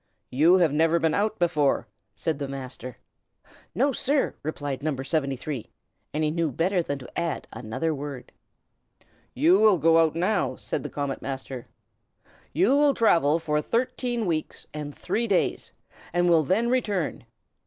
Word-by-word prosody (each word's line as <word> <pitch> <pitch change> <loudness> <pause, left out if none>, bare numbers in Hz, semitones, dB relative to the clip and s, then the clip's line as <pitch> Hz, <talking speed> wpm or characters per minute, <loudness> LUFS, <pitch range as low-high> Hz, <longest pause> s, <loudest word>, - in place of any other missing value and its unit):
"You 155 +8 +5
have 170 -6 +3
never 165 +2 +3
been 160 -2 +1
out 215 +1 0
before," 150 -5 +1 0.3
said 160 -3 -2
the 140 - -3
Master. 130 -2 -7 0.8
"No, 275 +5 +3
sir!" 275 +2 0
replied 145 -3 -4
No. 150 -1 -1
73; 135 -2 -3 0.4
and 155 +1 -1
he 150 - +1
knew 165 -2 0
better 180 +7 +1
than 145 -4 -3
to 130 +4 -7
add 170 -2 -3
another 130 +9 -2
word. 140 -3 -7 1.0
"You 165 +9 +5
will 215 -3 +6
go 165 0 +4
out 160 -1 +3
now," 185 +4 0
said - - -4
the - - -5
Comet 140 -2 -3
Master. 130 -2 -6 0.8
"You 190 - +3
will 290 -2 +4
travel 165 -9 +4
for 150 -2 0
thirteen 240 - -1
weeks 160 -4 -3
and 150 -1 -5
three 235 +1 -1
days, 195 -4 0 0.4
and 175 0 +2
will 170 -2 +5
then 210 - +1
return. 205 - -1
160 Hz, 155 wpm, -26 LUFS, 145-190 Hz, 1.0 s, will